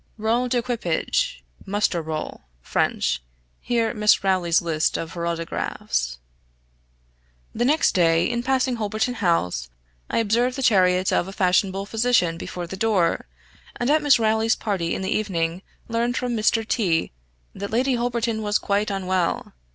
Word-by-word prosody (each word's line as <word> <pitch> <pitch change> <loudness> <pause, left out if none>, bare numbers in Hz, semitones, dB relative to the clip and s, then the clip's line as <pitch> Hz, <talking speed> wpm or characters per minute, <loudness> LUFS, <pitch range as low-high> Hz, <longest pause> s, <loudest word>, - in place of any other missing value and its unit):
{role 230 +3 +1
d'equipage 235 - -1
= - - -21
muster 195 -3 0
roll 155 -1 -5 0.2
(French); - - 0 0.4
here, 230 -2 0
Miss 210 -3 +3
Rowley's 185 -3 +2
list 160 -2 0
of 165 0 -5
her 170 -1 -3
autographs} 65 - -2 1.4
The 240 - 0
next 305 +5 +3
day, 165 -2 +3
in 240 0 -1
passing 260 0 +1
Holberton 215 +3 -1
House, 165 - 0 0.4
I - - -1
observed 235 +3 +1
the 270 - -2
chariot 185 -5 +3
of 175 - +1
a - - -6
fashionable 195 0 +1
physician 225 -6 +2
before 175 -1 -5
the 180 - -7
door; 190 -5 +1 0.5
and 245 +3 0
at 310 +1 +4
Miss 290 -2 +5
Rowley's 220 0 +2
party 185 -6 -2
in 190 - -4
the 190 - 0
evening 175 -4 -1 0.3
learned 235 +2 -1
from 245 -1 -1
Mr. 220 0 +1
T 180 -11 +1 0.4
that 200 +1 -5
Lady 255 +4 +1
Holberton 235 -2 -1
was 210 -1 +1
quite 205 +1 0
unwell. 185 -3 -1
205 Hz, 150 wpm, -23 LUFS, 175-235 Hz, 1.4 s, Miss